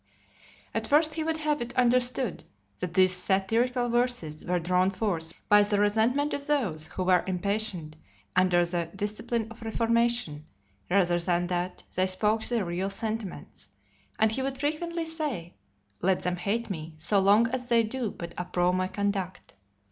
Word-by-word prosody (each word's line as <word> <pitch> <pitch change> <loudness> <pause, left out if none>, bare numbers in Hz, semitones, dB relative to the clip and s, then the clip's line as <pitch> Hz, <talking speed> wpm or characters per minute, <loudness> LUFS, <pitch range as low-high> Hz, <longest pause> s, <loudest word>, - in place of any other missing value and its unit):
At - - -2
first 305 +2 +4
he 320 - -2
would 320 0 -1
have 300 -2 -1
it 240 +1 -5
understood, 250 -2 +2 0.4
that 180 -1 -4
these 185 -1 +4
satirical 225 +7 +1
verses 240 -11 0
were 180 0 0
drawn 180 +2 +2
forth 185 -5 -2 0.2
by 205 0 +7
the 205 0 +1
resentment 225 +8 +2
of 280 +1 -4
those 195 - 0
who 185 - -4
were 180 -1 +3
impatient 185 -4 -2 0.4
under 180 -1 +4
the 170 -1 -2
discipline 215 +3 -2
of 230 - -12
reformation, 230 -8 0 0.4
rather 175 -2 +3
than 175 0 0
that 180 0 -3
they 185 +1 +1
spoke 210 +4 +1
their 235 -5 0
real 175 +3 -2
sentiments; 215 -1 -5 0.5
and 220 0 +3
he 265 - 0
would 270 0 -2
frequently 325 +4 -2
say, 295 - -4 0.5
"Let 185 0 +1
them 180 0 -1
hate 205 +6 -1
me, 160 -2 -6
so 175 +6 +4
long 200 +4 +5
as 250 0 -3
they 235 -1 +4
do 230 +1 -2
but 170 -3 -8
approve 180 0 0
my 185 0 0
conduct." 190 -1 -3
205 Hz, 160 wpm, -28 LUFS, 180-240 Hz, 0.5 s, by